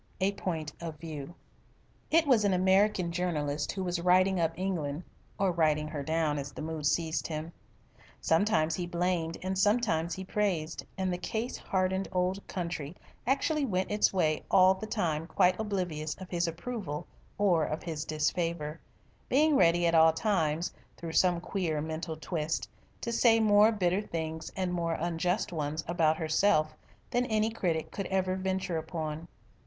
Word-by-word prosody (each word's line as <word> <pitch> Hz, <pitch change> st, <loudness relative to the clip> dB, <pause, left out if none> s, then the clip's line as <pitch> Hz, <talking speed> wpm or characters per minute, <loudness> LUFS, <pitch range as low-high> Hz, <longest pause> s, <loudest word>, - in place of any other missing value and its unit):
A 190 Hz, +1 st, +2 dB
POINT 160 Hz, -6 st, -4 dB
OF 165 Hz, -2 st, -5 dB
VIEW 155 Hz, 0 st, -7 dB, 0.7 s
It 330 Hz, 0 st, +4 dB
was 250 Hz, -7 st, +4 dB
an 200 Hz, -2 st, +3 dB
American 190 Hz, -1 st, +3 dB
journalist 150 Hz, -5 st, -1 dB
who 190 Hz, -, -3 dB
was 175 Hz, -1 st, -2 dB
writing 185 Hz, +1 st, +4 dB
up 165 Hz, -1 st, +2 dB
England 175 Hz, -5 st, -2 dB, 0.3 s
or 195 Hz, -2 st, +2 dB
writing 155 Hz, -3 st, +2 dB
her 150 Hz, -2 st, -4 dB
down 155 Hz, 0 st, 0 dB
as 140 Hz, 0 st, -5 dB
the -, -, -8 dB
mood 155 Hz, -2 st, -2 dB
seized 160 Hz, +1 st, 0 dB
him. 155 Hz, +1 st, -5 dB, 0.7 s
Sometimes 165 Hz, -2 st, +2 dB
he 175 Hz, -1 st, -3 dB
blamed 175 Hz, -1 st, -1 dB
and 190 Hz, +1 st, -1 dB
sometimes 195 Hz, -6 st, +2 dB
he 190 Hz, -, -6 dB
praised, 185 Hz, -5 st, -1 dB
and 190 Hz, -1 st, 0 dB
the 180 Hz, -, -3 dB
case 225 Hz, +6 st, -3 dB
hardened 190 Hz, 0 st, -1 dB
old 185 Hz, +2 st, 0 dB
country 170 Hz, -3 st, -4 dB, 0.3 s
actually 290 Hz, +3 st, +1 dB
went 190 Hz, -7 st, -1 dB
its 210 Hz, 0 st, +3 dB
way 155 Hz, -5 st, +1 dB
all 185 Hz, 0 st, +6 dB
the 195 Hz, +3 st, -7 dB
time 165 Hz, -7 st, -1 dB
quite 180 Hz, +2 st, +3 dB
oblivious 175 Hz, -8 st, -2 dB
of 185 Hz, -1 st, -11 dB
his 175 Hz, -1 st, +1 dB
approval 165 Hz, -3 st, -4 dB, 0.3 s
or 180 Hz, -6 st, +3 dB
of 155 Hz, +1 st, -3 dB
his 160 Hz, -3 st, -3 dB
disfavour 155 Hz, 0 st, -1 dB, 0.5 s
being 300 Hz, +3 st, +4 dB
ready 175 Hz, -4 st, +4 dB
at 170 Hz, -, +2 dB
all 160 Hz, 0 st, +6 dB
times, 160 Hz, -2 st, 0 dB, 0.2 s
through 165 Hz, -1 st, -6 dB
some 180 Hz, -1 st, +3 dB
queer 170 Hz, -4 st, -2 dB
mental 160 Hz, +1 st, -4 dB
twist, 160 Hz, 0 st, -2 dB, 0.3 s
to 235 Hz, -, -3 dB
say 230 Hz, -1 st, +4 dB
more 210 Hz, 0 st, +6 dB
bitter 190 Hz, -2 st, +1 dB
things 160 Hz, -4 st, -5 dB
and 185 Hz, -2 st, -1 dB
more 170 Hz, -1 st, 0 dB
unjust 175 Hz, +4 st, -1 dB
ones 155 Hz, 0 st, -2 dB
about 160 Hz, -2 st, +2 dB
herself 155 Hz, -1 st, +2 dB, 0.4 s
than 245 Hz, +1 st, +1 dB
any 220 Hz, -1 st, +1 dB
critic 170 Hz, -7 st, -1 dB
could 195 Hz, -, -4 dB
ever 185 Hz, -1 st, 0 dB
venture 190 Hz, -2 st, -2 dB
upon. 160 Hz, 0 st, -5 dB
175 Hz, 160 wpm, -30 LUFS, 160-190 Hz, 0.7 s, all